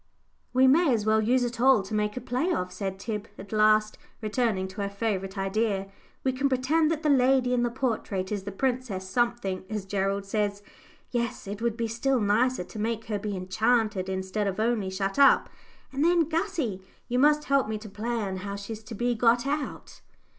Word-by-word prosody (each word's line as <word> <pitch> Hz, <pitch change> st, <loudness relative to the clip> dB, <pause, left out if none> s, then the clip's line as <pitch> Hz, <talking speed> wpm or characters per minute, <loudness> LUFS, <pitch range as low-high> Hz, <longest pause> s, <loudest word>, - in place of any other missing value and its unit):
"We 260 Hz, +1 st, +4 dB
may 290 Hz, +3 st, +5 dB
as 210 Hz, -2 st, -2 dB
well 220 Hz, 0 st, +3 dB
use 245 Hz, +3 st, +2 dB
it 240 Hz, -1 st, -3 dB
all 260 Hz, -5 st, +5 dB
to 195 Hz, -, -8 dB
make 210 Hz, +1 st, 0 dB
a -, -, -3 dB
play 255 Hz, +9 st, -1 dB
of," 180 Hz, -, -1 dB
said 195 Hz, -2 st, -4 dB
Tib, 210 Hz, +1 st, -4 dB
at 195 Hz, 0 st, -10 dB
last, 215 Hz, 0 st, +3 dB, 0.2 s
returning 215 Hz, -3 st, 0 dB
to 195 Hz, +2 st, -6 dB
her 200 Hz, -, -1 dB
favourite 200 Hz, -2 st, -3 dB
idea. 195 Hz, 0 st, -1 dB, 0.3 s
"We 265 Hz, -, +2 dB
can 270 Hz, +2 st, 0 dB
pretend 290 Hz, +5 st, +2 dB
that 320 Hz, 0 st, -2 dB
the 305 Hz, -, +2 dB
lady 255 Hz, -1 st, +3 dB
in 245 Hz, -, +2 dB
the 240 Hz, -, +1 dB
portrait 225 Hz, -6 st, -2 dB
is 205 Hz, -2 st, -1 dB
the 200 Hz, +1 st, -6 dB
princess 240 Hz, -4 st, -2 dB
something, 200 Hz, -3 st, -1 dB
as 210 Hz, -3 st, -3 dB
Gerald 195 Hz, 0 st, -1 dB
says. 205 Hz, 0 st, -1 dB, 0.5 s
Yes, 235 Hz, -1 st, -2 dB
it 200 Hz, +2 st, -6 dB
would 235 Hz, -1 st, 0 dB
be 230 Hz, -1 st, -1 dB
still 245 Hz, +4 st, 0 dB
nicer 220 Hz, +2 st, +2 dB
to 210 Hz, -, -9 dB
make 225 Hz, +1 st, -2 dB
her 210 Hz, -2 st, -1 dB
be 205 Hz, -1 st, -3 dB
enchanted 205 Hz, +1 st, +1 dB
instead 190 Hz, +2 st, -2 dB
of 195 Hz, +1 st, -3 dB
only 220 Hz, -3 st, +1 dB
shut 195 Hz, +4 st, -2 dB
up, 275 Hz, -, +6 dB, 0.4 s
and 275 Hz, +2 st, 0 dB
then, 340 Hz, -2 st, +4 dB
Gussie, 320 Hz, -, -2 dB, 0.3 s
you 245 Hz, 0 st, 0 dB
must 300 Hz, +2 st, +4 dB
help 275 Hz, -4 st, +2 dB
me 220 Hz, -, -2 dB
to 215 Hz, +1 st, -10 dB
plan 210 Hz, -2 st, -3 dB
how 200 Hz, +2 st, -5 dB
she's 210 Hz, +2 st, -7 dB
to 220 Hz, -, -7 dB
be 240 Hz, +3 st, 0 dB
got 235 Hz, +1 st, +3 dB
out." 290 Hz, +1 st, -4 dB
220 Hz, 200 wpm, -27 LUFS, 200-250 Hz, 0.5 s, up